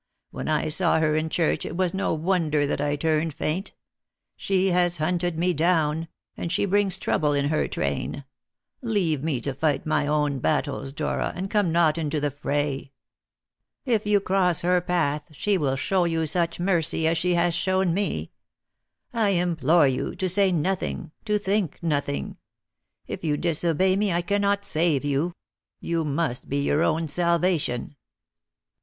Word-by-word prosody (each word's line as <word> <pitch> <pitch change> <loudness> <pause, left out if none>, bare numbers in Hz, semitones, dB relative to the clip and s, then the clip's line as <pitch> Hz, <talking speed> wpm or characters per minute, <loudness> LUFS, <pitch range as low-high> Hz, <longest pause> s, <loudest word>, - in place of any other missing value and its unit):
When - - -6
I 155 -1 +1
saw 165 +1 +2
her 155 -1 +2
in 155 +1 0
church 165 0 0
it 170 - -5
was 185 -2 +1
no 195 +1 -1
wonder 160 -3 +1
that 140 - -2
I 145 0 0
turned 155 0 0
faint. 180 +6 -2 0.6
She 190 -1 +1
has 175 -1 +2
hunted 175 +1 -1
me 180 +2 +1
down; 160 -1 +1 0.3
and 170 - -4
she 175 - +1
brings 200 -1 +2
trouble 150 -5 0
in 140 0 +1
her 155 - +1
train. 70 - -3 0.6
Leave 195 - 0
me 155 -6 0
to 140 +3 -3
fight 145 +3 0
my 155 -1 +1
own 150 -2 0
battles, 140 -1 -1
Dora, 140 - -2
and 190 +2 -4
come 205 -5 +2
not 165 -1 +3
into 150 -1 -1
the 145 0 -1
fray. 145 -1 -2 0.9
If 225 -5 0
you 205 -1 +4
cross 185 -3 +1
her 180 +1 +2
path 150 -4 -1
she 205 +8 0
will 140 -7 0
show 180 +6 +1
you 165 -1 0
such 170 +2 0
mercy 170 -3 +1
as 165 - +2
she 180 0 +1
has 170 0 +2
shown 185 0 +1
me. 200 +3 -2 0.8
I 225 -3 +2
implore 170 -4 +3
you 130 +5 -2
to 185 0 -1
say 190 +1 +3
nothing, 175 -1 -2
to 210 -1 +2
think 200 -4 -1
nothing. 145 -3 -2 0.7
If - - -6
you 150 -2 0
disobey 170 +3 +1
me 205 -1 +1
I 170 0 0
cannot 200 +1 0
save 155 -3 +1
you; 145 +5 0 0.4
you 170 -1 -1
must 145 -3 -2
be 140 - -1
your 145 +2 +1
own 160 0 +1
salvation." 170 -5 0
165 Hz, 165 wpm, -25 LUFS, 150-185 Hz, 0.9 s, you